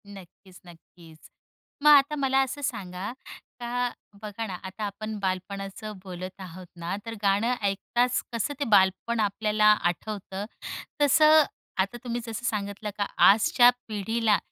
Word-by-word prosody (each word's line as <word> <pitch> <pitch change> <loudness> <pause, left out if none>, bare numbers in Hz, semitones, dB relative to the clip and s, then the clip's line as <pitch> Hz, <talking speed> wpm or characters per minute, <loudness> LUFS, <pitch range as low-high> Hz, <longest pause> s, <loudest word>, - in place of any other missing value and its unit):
नक्कीच, 190 -1 -14
नक्कीच. 165 -1 -17 0.5
मग 300 - +7
आता 285 +2 +4
मला 270 -2 +2
असं 270 +2 -5
सांगा, 200 -8 -4 0.5
का 245 +1 -1 0.3
बघा 215 +1 -5
ना 190 - -5
आता 190 +3 -7
आपण 215 +1 -5
बालपणाचं 195 +2 -4
बोलत 185 0 -8
आहोत 185 0 -9
ना, 170 +2 -4
तर 230 - -5
गाणं 205 +5 +2
ऐकताच 240 +5 0
कसं 230 +5 -1
ते 285 - 0
बालपण 200 +3 +3
आपल्याला 210 +1 +1 0.2
आठवतं, 195 +2 -3 0.6
तसं 305 +2 +6 0.4
आता 200 +5 -3
तुम्ही 240 -1 -3
जसं 225 +1 -5
सांगितलं 205 -1 -3
का 205 - 0 0.2
आजच्या 225 +4 +6 0.2
पिढीला 220 +1 +1
210 Hz, 130 wpm, -26 LUFS, 190-235 Hz, 0.6 s, मग